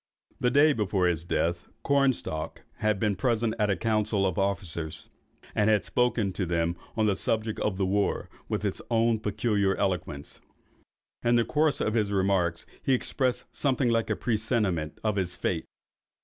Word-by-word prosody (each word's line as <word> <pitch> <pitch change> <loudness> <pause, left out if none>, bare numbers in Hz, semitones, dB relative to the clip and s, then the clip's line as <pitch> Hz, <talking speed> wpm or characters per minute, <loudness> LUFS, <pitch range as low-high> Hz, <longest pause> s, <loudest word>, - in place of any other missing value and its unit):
The 125 - +2
day 145 +4 +5
before 100 -5 0
his 85 -3 +1
death, 85 0 -1 0.2
Cornstalk 135 - 0
had 105 -2 +1
been 105 -2 +1
present 115 -1 +1
at 105 -1 +2
a 100 - +2
council 105 -2 +1
of 95 - +1
the 95 - 0
officers, 90 -6 -3 0.4
and 105 0 +2
had 105 -1 +3
spoken 120 -6 +1
to 95 -1 -2
them 85 0 0 0.2
on 110 - +3
the 100 -2 +2
subject 110 +2 -1
of 100 -3 -1
the 95 - +1
war, 100 +2 0 0.2
with - - -1
his - - -2
own 115 -1 +2
peculiar 105 -2 +1
eloquence. 90 -7 -3 0.8
In 120 0 +3
the 120 -1 +3
course 155 -1 +2
of 110 - 0
his 105 -3 +1
remarks, 95 -4 +1 0.2
he 135 - +2
expressed 130 0 -1
something 130 -3 +1
like 115 -1 +1
a - - +1
presentiment 105 -8 -1
of 105 -2 0
his 90 -2 -1
fate. 85 -3 -2
105 Hz, 170 wpm, -28 LUFS, 95-115 Hz, 0.8 s, day